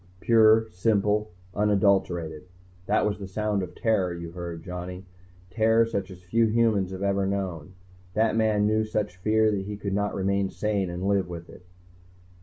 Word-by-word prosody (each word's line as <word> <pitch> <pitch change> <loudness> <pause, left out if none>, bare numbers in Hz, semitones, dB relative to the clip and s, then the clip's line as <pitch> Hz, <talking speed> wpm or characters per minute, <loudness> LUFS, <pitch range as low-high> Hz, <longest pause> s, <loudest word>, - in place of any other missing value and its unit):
"Pure. 110 0 +5
Simple. 105 +2 +1 0.2
Unadulterated. 95 -6 +1 0.4
That - - +2
was 105 -1 -1
the 100 - -6
sound 105 +1 -1
of 90 - -7
terror 100 -6 +1
you 85 -1 -6
heard, 85 -2 -7
Johnny. 90 +1 -7 0.5
Terror 115 +2 +3
such 100 -4 -3
as 90 -2 -12
few 115 +6 +2
humans 110 -4 +2
have 95 +1 -6
ever 100 -1 +1
known. 95 -4 -4 0.4
That 110 0 +2
man 110 -2 +2
knew 110 +1 +2
such 105 -3 -3
fear 110 +3 +2
he 100 +1 -4
could 100 -1 -4
not 105 +1 -1
remain 100 0 0
sane 100 -3 -1
and 90 +2 -3
live 100 -2 +1
with 85 -1 -8
it." 90 - -16
100 Hz, 165 wpm, -26 LUFS, 90-110 Hz, 0.5 s, Pure